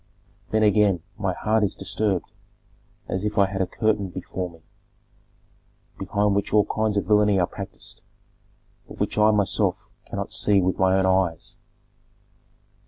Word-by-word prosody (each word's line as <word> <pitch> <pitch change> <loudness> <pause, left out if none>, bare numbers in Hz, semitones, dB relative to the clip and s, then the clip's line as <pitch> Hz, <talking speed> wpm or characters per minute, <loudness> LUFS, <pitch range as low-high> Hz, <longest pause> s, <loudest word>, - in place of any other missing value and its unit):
Then 110 0 +2
again 105 -5 +3
my 100 -4 -1
heart 110 0 +1
is 100 - 0
disturbed, 100 -4 -2 0.8
as 95 +2 -2
if 105 0 -2
I 100 - +6
had 95 0 -3
a 95 - 0
curtain 105 0 0
before 90 0 -5
me, 85 -1 -18 1.4
behind 100 +1 +1
which 100 0 -1
all 105 -1 +4
kinds 110 -1 -1
of 100 - 0
villany 105 -1 +4
are 90 - +3
practised, - - -8 0.9
but - - -12
which - - -1
I 105 +1 +6
myself 105 -3 +1 0.2
cannot - - -5
see 100 -1 +3
with 95 0 0
my 95 0 +4
own 95 - +2
eyes." 95 -3 0
100 Hz, 150 wpm, -24 LUFS, 95-105 Hz, 1.4 s, I